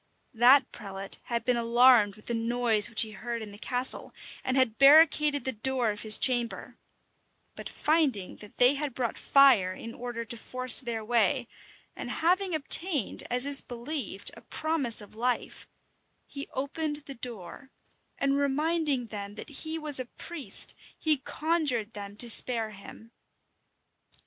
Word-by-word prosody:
That 245 +3 +4
prelate 195 -1 -3
had 235 -1 -4
been 250 -1 0
alarmed 235 -3 +3
with 215 - -18
the 235 - -4
noise 230 -1 +3
which 225 -1 +4
he 220 - -7
heard 230 +2 -7
in 210 - -11
the 205 - -13
castle, 250 +2 +3 0.3
and 260 +1 -2
had 255 -4 0
barricadoed 295 0 +4
the 260 - -2
door 245 0 -2
of 205 - -7
his 215 -1 +6
chamber; 240 -3 0 0.8
but - - -8
finding 290 - -2
that 210 - -15
they 250 +2 +5
had 285 -3 -5
brought 240 -3 -3
fire 250 -10 +3
in 230 +3 -10
order 240 -1 -7
to 235 - -4
force 255 +2 +5
their 230 -4 -6
way, 240 +2 0 0.5
and - - -8
having 360 +2 -1
obtained, 310 - +2
as 250 +2 +1
is 280 -1 +8
believed, 240 -4 -6
a - - -15
promise 295 -9 -1
of 205 - -14
life, 245 +3 -4 0.6
he 280 0 -9
opened 295 +2 -5
the 275 - -8
door, 240 +1 -10 0.5
and 275 0 -1
reminding 290 -1 -1
them 205 -2 -9
that 220 - -10
he 315 +3 -5
was 300 -4 +3
a 255 - -5
priest, 305 +4 -2 0.2
he 310 -2 +1
conjured 280 -6 -2
them 200 -1 -9
to 240 - 0
spare 225 -1 +2
him. 215 +3 -14
245 Hz, 155 wpm, -26 LUFS, 225-280 Hz, 0.8 s, is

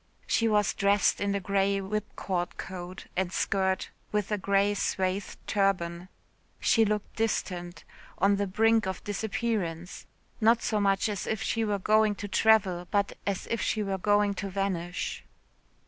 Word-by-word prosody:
She 230 - +2
was 210 -2 +2
dressed 200 +1 +2
in 200 0 0
a - - 0
grey 200 +1 +1
whipcord 190 -3 -3
coat 185 0 -7
and 185 -1 0
skirt 190 -1 0 0.2
with 210 -1 -1
a 210 - +1
grey 200 +1 +2
swathed 190 -1 -1
turban. 185 -3 0 0.5
She 225 -1 +4
looked 210 -1 -2
distant 180 -6 -2 0.3
on 200 +1 +3
the 200 0 0
brink 225 +2 +3
of 190 -2 -4
disappearance 200 -5 -3 0.3
not 230 +2 +4
so 215 - 0
much 195 0 +2
as 205 -4 -3
if 220 - -1
she 225 - 0
were 210 -2 0
going 215 +1 +3
to 205 - -6
travel 190 -4 +3
but 200 -1 0
as 200 -2 -1
if 230 - 0
she 215 - 0
were 195 -1 -2
going 205 +1 +3
to 195 0 -4
vanish. 185 -3 -3
200 Hz, 155 wpm, -28 LUFS, 190-210 Hz, 0.5 s, She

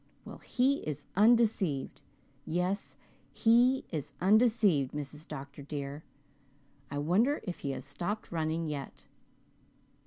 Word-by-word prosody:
Well, - - -9
he 265 +3 +1
is 150 -1 -5
undeceived 210 - +3 0.4
yes, 180 +4 -2 0.3
he 245 +3 +4
is 145 -3 -4
undeceived, 205 - +4
Mrs. 150 +1 -6
Dr. 140 -1 -8
dear. 140 0 -5 0.9
I 145 - -4
wonder 200 - +2
if 180 -4 -5
he 140 - -4
has - - -6
stopped 205 +5 -4
running 160 0 -1
yet." 145 -3 -6
170 Hz, 115 wpm, -31 LUFS, 145-220 Hz, 0.9 s, he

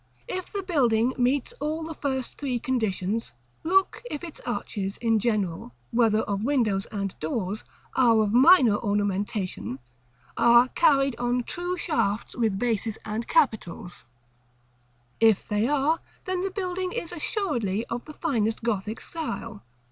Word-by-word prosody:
If 370 0 -4
the 400 -1 -3
building 255 - +2
meets 255 +2 +1
all 310 +2 -2
the 325 +1 -5
first 265 -4 -3
three 265 -4 -1
conditions, 220 - -1 0.3
look 385 +3 +2
if 295 - -5
its 335 -3 -8
arches 200 -5 -3
in 225 -2 +2
general, 195 - -1 0.2
whether 225 -2 +3
of 200 0 -2
windows 225 -8 +1
and 200 -2 -3
doors, 190 +5 -3 0.3
or 230 -4 +5
of 210 0 -1
minor 255 - +7
ornamentation, 205 - -1 0.6
are 240 +1 +6
carried 275 -5 +3
on 245 0 0
true 355 +7 -3
shafts 230 - -1
with 225 -5 +1
bases 225 -1 -1
and 220 +2 -3
capitals. 220 - 0 1.1
If 220 -3 +4
they 210 +2 +1
are, 295 +3 +2 0.3
then 370 -1 -1
the 390 - -1
building 370 -1 -3
is 335 - -4
assuredly 245 - -1
of 235 +1 -5
the 305 - -9
finest 225 -10 -1
Gothic 220 -1 -2
style. 230 -10 -5
235 Hz, 140 wpm, -26 LUFS, 210-295 Hz, 1.1 s, minor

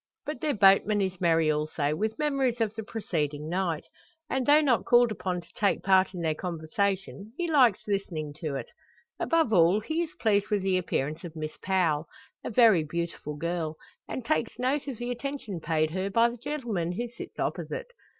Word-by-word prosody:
But 295 -4 -5
their 300 -2 0
boatman 200 +1 +5
is 190 -2 -2
merry 165 -2 +3
also, 150 -1 -1
with 220 +6 -2
memories 275 -5 0
of 220 -2 0
the 220 - -5
preceding 155 -9 -3
night; 170 -2 -1 0.5
and, 260 -2 0
though 295 +1 +7
not 270 -6 +2
called 240 -1 +5
upon 185 -4 -3
to 170 - -22
take 205 - +1
part 190 0 +3
in 175 - -4
their 160 -2 +1
conversation, 195 +5 -3
he 350 - -1
likes 260 - +4
listening 170 -7 -2
to 155 -3 -3
it. 135 - -6 0.5
Above 325 -8 +2
all 175 +2 +5
he 315 +10 -2
is 330 -2 -4
pleased 205 -2 +2
with 205 -2 +1
the 190 -1 +2
appearance 155 -2 -2
of 170 -2 -8
Miss 155 -1 -5
Powell, 170 -5 +1 0.4
a - - -3
very 220 -7 +5
beautiful 165 -1 -4
girl; 165 -1 -2 0.3
and 255 - -5
takes 240 -6 0
note 265 +3 0
of 265 -5 -4
the 240 +2 -3
attention 245 -7 -4
paid 155 -1 0
her 190 +3 -2
by 230 +3 +3
the 240 - -9
gentleman 235 - -3
who 240 +6 -3
sits 235 - -10
opposite. - - -3
195 Hz, 190 wpm, -28 LUFS, 165-240 Hz, 0.5 s, though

